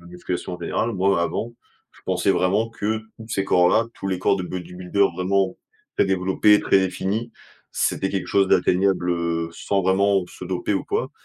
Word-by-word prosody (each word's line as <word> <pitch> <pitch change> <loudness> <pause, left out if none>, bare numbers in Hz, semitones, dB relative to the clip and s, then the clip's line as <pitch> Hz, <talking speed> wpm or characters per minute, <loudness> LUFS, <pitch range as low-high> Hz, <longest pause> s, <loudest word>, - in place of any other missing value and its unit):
la 85 - -16
musculation 90 +1 -5
en 90 - -7
général. 115 - -1
Moi, 95 -2 +2
avant, 115 +7 -3 0.4
je - - -21
pensais 95 +1 +1
vraiment 100 +4 +1
que 110 -1 -2 0.2
tous 110 0 -11
ces 100 -3 -1
corps 90 -2 +4
là, 115 - +3
tous - - -7
les 95 -1 -1
corps 95 +1 +2
de 95 - -3
bodybuilders 90 +2 -1
vraiment 95 +2 0 0.4
très - - +4
développés, 95 +2 +3
très - - +3
définis, 95 +5 -2 0.4
c'était 95 - 0
quelque 95 -2 -2
chose 100 -1 +3
d'atteignable, 90 0 +2
heu, 85 -1 -1
sans 100 +3 -1
vraiment 95 +1 +2
se 90 - -10
doper 90 +2 -2
ou 95 - -2
quoi - - -2
95 Hz, 185 wpm, -23 LUFS, 90-100 Hz, 0.4 s, corps